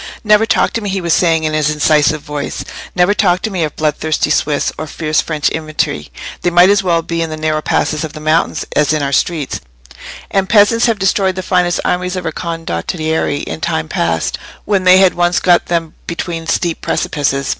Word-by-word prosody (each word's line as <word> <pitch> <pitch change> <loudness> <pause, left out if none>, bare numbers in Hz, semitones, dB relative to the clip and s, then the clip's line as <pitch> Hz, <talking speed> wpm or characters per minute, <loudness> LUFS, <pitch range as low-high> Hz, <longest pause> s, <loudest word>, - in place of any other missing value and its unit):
"Never 215 +1 +4
talk - - +2
to 230 - -2
me," 205 - -3
he 195 0 -1
was 170 -3 0
saying, 165 -3 +2
in 155 0 -1
his 155 -1 +1
incisive 150 0 +2
voice, 145 -1 -5 0.3
"never 180 +2 +3
talk 180 -3 +1
to 220 - -2
me 180 -4 -1
of 150 -2 -3
bloodthirsty 155 0 0
Swiss 150 -1 0
or 155 - -6
fierce 155 0 0
French 155 -2 -1
infantry: 155 - -3 0.3
they 175 - +1
might 175 +2 +5
as 205 -1 +3
well 170 -3 +1
be 170 0 -3
in 165 - -2
the 155 - -5
narrow 155 0 -1
passes 155 0 0
of 155 - -5
the 155 - -8
mountains 155 +2 0
as 150 0 +3
in 150 -2 0
our 140 - -1
streets; 140 - -1 0.7
and 195 -1 0
peasants 230 +2 +4
have 230 -2 +1
destroyed 195 -1 +1
the 185 - -4
finest 180 -2 +1
armies 180 +1 -1
of 180 -2 -4
our 165 - -1
condottieri 160 - -2
in 80 - -6
time 80 0 -1
past, 80 0 -1 0.3
when 195 -3 0
they 185 0 +7
had 190 -1 +5
once 175 0 +1
got 175 -1 +3
them 165 -2 -1
between 170 -1 -4
steep 170 -1 -1
precipices. 140 -2 -1
165 Hz, 205 wpm, -15 LUFS, 155-185 Hz, 0.7 s, they